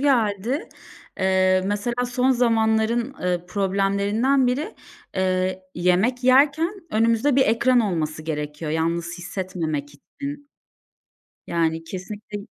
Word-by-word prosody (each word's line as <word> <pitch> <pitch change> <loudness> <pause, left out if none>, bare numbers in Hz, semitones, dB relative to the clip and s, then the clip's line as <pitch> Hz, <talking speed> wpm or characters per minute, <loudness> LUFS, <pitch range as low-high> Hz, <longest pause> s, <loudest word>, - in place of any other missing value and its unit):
geldi. 240 - +1 0.5
Eee, 185 0 +3
mesela 235 +5 -1
son 255 +1 +2
zamanların, 230 +1 +2
ııı, 180 -1 -1
problemlerinden 200 +7 +1
biri, 265 +6 -1 0.4
eee, 185 0 0
yemek 190 +9 +1
yerken 285 +8 +4 0.2
önümüzde 230 +5 +2
bir 265 - +5
ekran 240 +3 +3
olması 160 -7 -2
gerekiyor 150 0 -4
yalnız 170 +2 -1
hissetmemek 170 -5 -4
için. 285 - -8 1.0
Yani, 165 -1 0
kesinlikle 205 +4 -7
205 Hz, 100 wpm, -23 LUFS, 180-245 Hz, 1.0 s, bir